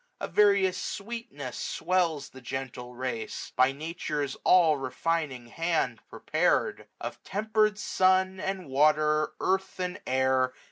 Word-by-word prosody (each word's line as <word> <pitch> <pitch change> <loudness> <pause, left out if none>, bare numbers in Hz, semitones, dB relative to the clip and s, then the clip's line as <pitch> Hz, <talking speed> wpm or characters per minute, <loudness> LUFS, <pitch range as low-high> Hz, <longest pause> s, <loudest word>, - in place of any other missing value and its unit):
A - - -3
various 200 -2 +3
sweetness 200 - -6
swells 170 -6 0
the 130 - -13
gentle 125 -1 -6
race 120 -3 -4
j - - -28
By 130 +1 +4
Nature's 150 -2 -3
all 165 -5 +5
refining 135 -1 -2
hand 165 -7 0
prepared; - - 0
Of - - -6
temper'd 215 +1 +1
sun, 190 -1 +2
and 190 -3 -3
water, 150 +2 +3
earth, 190 0 -1
and 180 0 -3
air. 130 0 +2
155 Hz, 125 wpm, -28 LUFS, 130-185 Hz, -, all